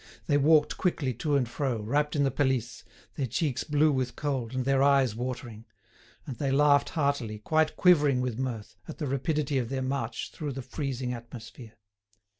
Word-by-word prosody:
They 145 Hz, -2 st, +2 dB
walked 150 Hz, +1 st, +4 dB
quickly 150 Hz, -8 st, 0 dB
to 145 Hz, +6 st, -1 dB
and 130 Hz, -3 st, +2 dB
fro, 125 Hz, -1 st, -2 dB
wrapped 145 Hz, +8 st, 0 dB
in 145 Hz, -, +2 dB
the 135 Hz, -, +2 dB
pelisse, 130 Hz, -3 st, -1 dB, 0.3 s
their 135 Hz, -3 st, -2 dB
cheeks 145 Hz, +1 st, -1 dB
blue 150 Hz, +1 st, +3 dB
with 130 Hz, -3 st, -1 dB
cold, 130 Hz, -5 st, -3 dB
and 130 Hz, -1 st, -1 dB
their 135 Hz, 0 st, +2 dB
eyes 135 Hz, -5 st, +4 dB
watering; 120 Hz, -2 st, -5 dB, 0.6 s
and 130 Hz, -, -6 dB
they 140 Hz, -, 0 dB
laughed 145 Hz, +1 st, +4 dB
heartily, 140 Hz, -7 st, 0 dB
quite 155 Hz, +8 st, +1 dB
quivering 150 Hz, -8 st, +4 dB
with 125 Hz, -2 st, -2 dB
mirth, 115 Hz, -5 st, -4 dB
at -, -, -8 dB
the 150 Hz, -, -3 dB
rapidity 140 Hz, +1 st, 0 dB
of 120 Hz, -2 st, -3 dB
their 135 Hz, -1 st, -2 dB
march 130 Hz, -3 st, -3 dB
through 150 Hz, -3 st, -5 dB
the 135 Hz, 0 st, -6 dB
freezing 130 Hz, -1 st, -3 dB
atmosphere. 115 Hz, -1 st, -10 dB
135 Hz, 180 wpm, -28 LUFS, 125-145 Hz, 0.6 s, walked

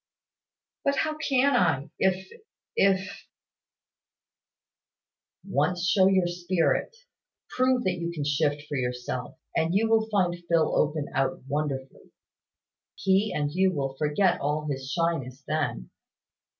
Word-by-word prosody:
"But 280 Hz, 0 st, +2 dB
how 310 Hz, +2 st, 0 dB
can 280 Hz, -3 st, +2 dB
I, 160 Hz, -, +1 dB
if 190 Hz, 0 st, 0 dB, 0.4 s
if 195 Hz, 0 st, +1 dB, 1.4 s
" -, -, -66 dB
"Once 180 Hz, 0 st, 0 dB
show 190 Hz, 0 st, +5 dB
your 190 Hz, -2 st, +3 dB
spirit, 175 Hz, -, 0 dB, 0.5 s
prove 255 Hz, -1 st, +2 dB
that 180 Hz, -2 st, -1 dB
you 170 Hz, 0 st, -2 dB
can 155 Hz, -4 st, -4 dB
shift 145 Hz, 0 st, 0 dB
for 145 Hz, -, -3 dB
yourself, 125 Hz, +2 st, -4 dB, 0.2 s
and 165 Hz, +3 st, +1 dB
you 220 Hz, +3 st, +3 dB
will 220 Hz, 0 st, +3 dB
find 180 Hz, -4 st, 0 dB
Phil 165 Hz, -2 st, +3 dB
open 150 Hz, 0 st, +1 dB
out 135 Hz, -1 st, -1 dB
wonderfully. 140 Hz, -2 st, -4 dB, 0.8 s
He 195 Hz, +2 st, +2 dB
and 145 Hz, -1 st, -1 dB
you 190 Hz, +3 st, +2 dB
will 135 Hz, -3 st, -2 dB
forget 155 Hz, +6 st, +1 dB
all 150 Hz, +2 st, -1 dB
his 135 Hz, -1 st, -4 dB
shyness 145 Hz, -6 st, -1 dB
then. 145 Hz, -, -2 dB
170 Hz, 125 wpm, -27 LUFS, 145-190 Hz, 1.4 s, show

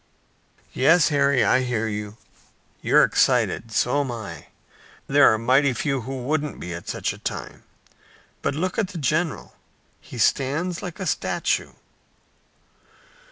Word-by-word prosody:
"Yes, 165 Hz, +5 st, +4 dB
Harry, 140 Hz, -3 st, +3 dB
I 130 Hz, -, +4 dB
hear 120 Hz, -3 st, -1 dB
you. 105 Hz, 0 st, -5 dB, 0.6 s
You're -, -, +5 dB
excited. 115 Hz, -, +1 dB
So 125 Hz, +5 st, +1 dB
am 135 Hz, -3 st, -3 dB
I. 110 Hz, -4 st, -8 dB, 0.6 s
There 145 Hz, +1 st, +5 dB
are 110 Hz, -, +1 dB
mighty 130 Hz, +4 st, +3 dB
few 135 Hz, 0 st, -1 dB
who 130 Hz, +1 st, -6 dB
wouldn't 150 Hz, +2 st, -2 dB
be 90 Hz, -, -6 dB
at 85 Hz, -, -8 dB
such -, -, -2 dB
a -, -, -13 dB
time; -, -, -6 dB, 0.8 s
but 140 Hz, -, -1 dB
look 185 Hz, +7 st, -2 dB
at 210 Hz, -, +1 dB
the 185 Hz, -2 st, -8 dB
general! 155 Hz, +2 st, -1 dB, 0.5 s
He -, -, -11 dB
stands 150 Hz, +9 st, 0 dB
like 180 Hz, +1 st, -7 dB
a 190 Hz, -, -3 dB
statue!" -, -, -1 dB
135 Hz, 140 wpm, -23 LUFS, 120-155 Hz, 0.8 s, You're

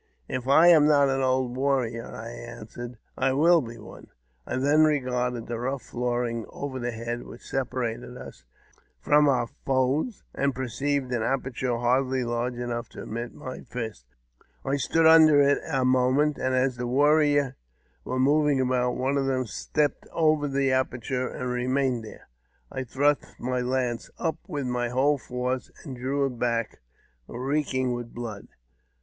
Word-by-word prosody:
If 130 Hz, 0 st, -4 dB
I 150 Hz, +5 st, +6 dB
am 155 Hz, -4 st, +7 dB
not 140 Hz, -2 st, +5 dB
an 135 Hz, 0 st, 0 dB
old 130 Hz, -1 st, +1 dB
warrior," 130 Hz, -4 st, 0 dB
I 115 Hz, +1 st, -8 dB
answered, 120 Hz, +1 st, -9 dB
" -, -, -41 dB
I -, -, +1 dB
will 165 Hz, +4 st, +5 dB
be 115 Hz, -2 st, -8 dB
one 110 Hz, -, -12 dB, 0.4 s
I -, -, -2 dB
then 145 Hz, +4 st, +4 dB
regarded 125 Hz, -5 st, 0 dB
the 120 Hz, -1 st, -4 dB
rough 130 Hz, +2 st, -3 dB
flooring 120 Hz, -1 st, -2 dB
over 135 Hz, -2 st, -5 dB
head, 120 Hz, +1 st, -4 dB
which 120 Hz, -, -12 dB
separated 125 Hz, -2 st, -3 dB
us 65 Hz, -, -11 dB, 0.6 s
from 150 Hz, 0 st, +4 dB
our 125 Hz, -3 st, +2 dB, 0.2 s
foes, 135 Hz, -, 0 dB
and 140 Hz, -1 st, 0 dB
perceived 130 Hz, +1 st, -2 dB
an 120 Hz, -2 st, 0 dB
aperture 130 Hz, 0 st, -1 dB
hardly 130 Hz, +2 st, +1 dB
large 120 Hz, +1 st, -2 dB
enough 120 Hz, -1 st, -4 dB
to -, -, -9 dB
admit 115 Hz, +2 st, -5 dB
my 130 Hz, -, -7 dB
fist. 110 Hz, -, -6 dB, 0.6 s
I 135 Hz, +1 st, +1 dB
stood 165 Hz, +4 st, +2 dB
under 160 Hz, -2 st, +8 dB
it 140 Hz, 0 st, +4 dB
a 130 Hz, -1 st, +1 dB
moment, 130 Hz, +4 st, +2 dB
and 130 Hz, 0 st, 0 dB
as 130 Hz, -1 st, +1 dB
the 125 Hz, 0 st, -3 dB
warriors 145 Hz, 0 st, +3 dB, 0.5 s
were 130 Hz, -, -3 dB
moving 145 Hz, +1 st, +3 dB
about, 125 Hz, -1 st, +1 dB
one 135 Hz, +2 st, 0 dB
of 135 Hz, -, 0 dB
them 130 Hz, -1 st, 0 dB
stepped 145 Hz, +7 st, -1 dB
over 155 Hz, -2 st, +2 dB
the 135 Hz, -1 st, +1 dB
aperture 130 Hz, 0 st, -1 dB
and 125 Hz, -, -5 dB
remained 125 Hz, -1 st, 0 dB
there. 110 Hz, -, -12 dB, 0.4 s
I 130 Hz, -1 st, -4 dB
thrust 145 Hz, +4 st, 0 dB
my 125 Hz, +1 st, -1 dB
lance 125 Hz, -1 st, -1 dB
up 165 Hz, -1 st, -1 dB
with 145 Hz, -3 st, -3 dB
my 125 Hz, -1 st, -1 dB
whole 140 Hz, +4 st, +2 dB
force, 125 Hz, 0 st, -3 dB
and 135 Hz, -5 st, -7 dB
drew 135 Hz, +3 st, -1 dB
it 125 Hz, -3 st, -4 dB
back 115 Hz, -2 st, -1 dB, 0.5 s
reeking 130 Hz, 0 st, -1 dB
with 120 Hz, -1 st, -6 dB
blood. 115 Hz, -4 st, -6 dB
130 Hz, 160 wpm, -26 LUFS, 120-140 Hz, 0.6 s, under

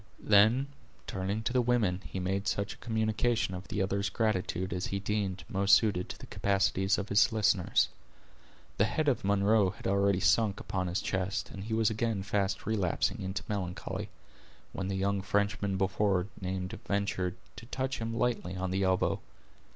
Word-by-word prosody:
Then 110 Hz, +6 st, +5 dB, 0.4 s
turning 100 Hz, +3 st, -3 dB
to 120 Hz, -, -1 dB
the 125 Hz, -, +4 dB
women, 115 Hz, -7 st, +1 dB
he 95 Hz, -, -5 dB
made 95 Hz, +2 st, -1 dB
such 100 Hz, +1 st, -1 dB
a -, -, -16 dB
communication 110 Hz, -1 st, 0 dB
of 90 Hz, +1 st, -7 dB
the 95 Hz, 0 st, -1 dB
other's 100 Hz, +1 st, -1 dB
gratitude 95 Hz, -4 st, -1 dB
as 90 Hz, 0 st, -2 dB
he 100 Hz, -, -2 dB
deemed 100 Hz, -1 st, -2 dB
most 100 Hz, 0 st, +5 dB
suited 100 Hz, -5 st, +1 dB
to -, -, -6 dB
the -, -, -11 dB
capacities 95 Hz, 0 st, +1 dB
of 100 Hz, 0 st, -4 dB
his 100 Hz, +4 st, +4 dB
listeners. 110 Hz, -4 st, +3 dB, 0.9 s
The 105 Hz, -, +4 dB
head 150 Hz, +7 st, -1 dB
of 135 Hz, -, +2 dB
Munro 100 Hz, +1 st, +3 dB
had 90 Hz, -, -11 dB
already 100 Hz, -1 st, +2 dB
sunk 105 Hz, -1 st, +3 dB
upon 95 Hz, -1 st, -2 dB
his 90 Hz, +2 st, -1 dB
chest, 95 Hz, 0 st, -2 dB
and 95 Hz, 0 st, -7 dB
he 110 Hz, 0 st, -1 dB
was 110 Hz, -1 st, +3 dB
again 110 Hz, -2 st, -1 dB
fast 100 Hz, 0 st, -1 dB
relapsing 100 Hz, -5 st, 0 dB
into 95 Hz, +1 st, -3 dB
melancholy, 90 Hz, -4 st, -4 dB, 0.6 s
when 95 Hz, -, -3 dB
the 100 Hz, -, -2 dB
young 100 Hz, +1 st, 0 dB
Frenchman 100 Hz, 0 st, 0 dB
before 95 Hz, -1 st, +1 dB, 0.2 s
named 95 Hz, 0 st, -4 dB
ventured 100 Hz, -3 st, -1 dB, 0.2 s
to 115 Hz, +2 st, -10 dB
touch 130 Hz, 0 st, -2 dB
him 115 Hz, 0 st, -3 dB
lightly 115 Hz, -6 st, -1 dB
on 95 Hz, 0 st, -2 dB
the 95 Hz, +1 st, 0 dB
elbow. 95 Hz, -1 st, +2 dB
100 Hz, 175 wpm, -30 LUFS, 95-110 Hz, 0.9 s, Then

